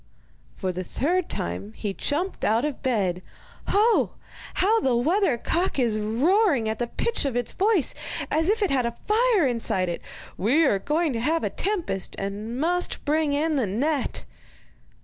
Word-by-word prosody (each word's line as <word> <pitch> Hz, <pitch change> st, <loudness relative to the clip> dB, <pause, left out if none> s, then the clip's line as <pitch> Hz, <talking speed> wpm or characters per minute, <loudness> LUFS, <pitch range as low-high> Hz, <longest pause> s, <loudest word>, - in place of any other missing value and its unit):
For 185 Hz, -, -2 dB
the 180 Hz, +1 st, -4 dB
third 345 Hz, -, -1 dB
time 90 Hz, +5 st, -4 dB
he 200 Hz, -, -4 dB
jumped 330 Hz, -, -2 dB
out 225 Hz, +5 st, +2 dB
of 300 Hz, -3 st, -4 dB
bed. 195 Hz, -8 st, 0 dB, 0.5 s
'Ho! 440 Hz, +3 st, +3 dB, 0.4 s
how 435 Hz, +5 st, +3 dB
the 260 Hz, -, +1 dB
weather 305 Hz, -, +2 dB
cock 345 Hz, +9 st, -1 dB
is 230 Hz, -5 st, +1 dB
roaring 270 Hz, -, +2 dB
at 220 Hz, 0 st, -2 dB
the 240 Hz, -, -1 dB
pitch 465 Hz, -, -1 dB
of 275 Hz, -4 st, -1 dB
its 245 Hz, -, -1 dB
voice, 400 Hz, -, +2 dB, 0.4 s
as 320 Hz, +4 st, +2 dB
if 430 Hz, +1 st, +2 dB
it 395 Hz, -, +1 dB
had 255 Hz, -3 st, +2 dB
a 235 Hz, -, -5 dB
fire 440 Hz, -5 st, +3 dB
inside 225 Hz, -7 st, 0 dB
it! 170 Hz, -, -4 dB, 0.4 s
We 260 Hz, -, +3 dB
are 200 Hz, -8 st, +2 dB
going 305 Hz, -, 0 dB
to 230 Hz, -, -2 dB
have 320 Hz, +7 st, +1 dB
a -, -, -1 dB
tempest, 355 Hz, -, -2 dB
and 205 Hz, +4 st, -4 dB
must 355 Hz, +4 st, -1 dB
bring 305 Hz, 0 st, +1 dB
in 305 Hz, +1 st, +1 dB
the 245 Hz, -6 st, +1 dB
net. 275 Hz, +8 st, -1 dB
280 Hz, 170 wpm, -25 LUFS, 220-350 Hz, 0.5 s, Ho